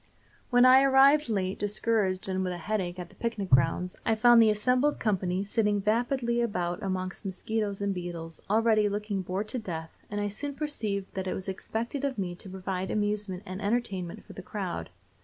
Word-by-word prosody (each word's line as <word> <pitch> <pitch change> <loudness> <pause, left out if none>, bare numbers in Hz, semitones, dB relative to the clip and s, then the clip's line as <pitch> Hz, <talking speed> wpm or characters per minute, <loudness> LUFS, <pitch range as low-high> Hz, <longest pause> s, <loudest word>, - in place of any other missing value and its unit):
When 245 0 +6
I 260 +1 +8
arrived 275 +1 +5
late, 190 -3 -1
discouraged 205 -2 0
and 190 0 -1
with 180 -1 -2
a - - -5
headache, 180 -1 -2
at 175 -1 -7
the - - -19
picnic 225 -5 -3
grounds, 140 +7 +3
I 225 - +2
found 235 +1 +7
the 220 - +6
assembled 250 +7 +2
company 190 -3 0
sitting 205 0 +1
vapidly 235 +3 +1
about 180 -6 -1
among 185 -1 -2
mosquitoes 200 +1 -2
and 200 -1 0
beetles, 170 -3 -6
already 215 -1 +3
looking 205 -1 -2
bored 190 +3 -3
to 255 - -2
death, 165 -6 -6
and 205 - -3
I 205 - 0
soon 280 +8 -4
perceived 215 -11 -3
that 190 0 -3
it - - -1
was 190 - -5
expected 230 +7 -3
of 275 -3 -1
me 185 -3 -2
to 190 +2 -9
provide 190 0 -4
amusement 205 -3 -1
and 185 +2 -6
entertainment 200 -5 -2
for - - -12
the - - -8
crowd. - - -4
205 Hz, 190 wpm, -28 LUFS, 185-230 Hz, -, I